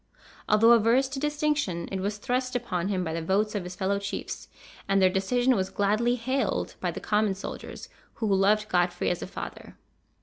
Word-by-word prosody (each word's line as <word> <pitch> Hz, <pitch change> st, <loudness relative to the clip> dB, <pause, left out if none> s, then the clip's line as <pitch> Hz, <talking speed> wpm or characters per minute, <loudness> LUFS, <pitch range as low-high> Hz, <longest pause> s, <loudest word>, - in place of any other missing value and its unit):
Although 220 Hz, +2 st, +6 dB
averse 235 Hz, +4 st, +4 dB
to 270 Hz, 0 st, -4 dB
distinction, 295 Hz, -, -1 dB
it 195 Hz, -, -2 dB
was 205 Hz, +2 st, -2 dB
thrust 255 Hz, +4 st, -2 dB
upon 190 Hz, -8 st, -1 dB
him 190 Hz, -2 st, 0 dB
by 160 Hz, -2 st, -3 dB
the 165 Hz, -, -2 dB
votes 200 Hz, +5 st, +1 dB
of 205 Hz, -3 st, -2 dB
his 180 Hz, +1 st, -7 dB
fellow 195 Hz, +2 st, 0 dB
chiefs, 200 Hz, 0 st, -5 dB, 0.4 s
and 195 Hz, 0 st, +4 dB
their 185 Hz, -1 st, +5 dB
decision 245 Hz, +7 st, +2 dB
was 190 Hz, -2 st, -1 dB
gladly 215 Hz, +4 st, +1 dB
hailed 260 Hz, +3 st, -1 dB
by -, -, -1 dB
the -, -, -5 dB
common 210 Hz, -2 st, +1 dB
soldiers, 195 Hz, -, -7 dB, 0.3 s
who 225 Hz, -, -3 dB
loved 205 Hz, +1 st, +3 dB
Godfrey 175 Hz, -2 st, +1 dB
as 175 Hz, -, -3 dB
a -, -, -4 dB
father. -, -, -8 dB
205 Hz, 190 wpm, -27 LUFS, 190-240 Hz, 0.4 s, Although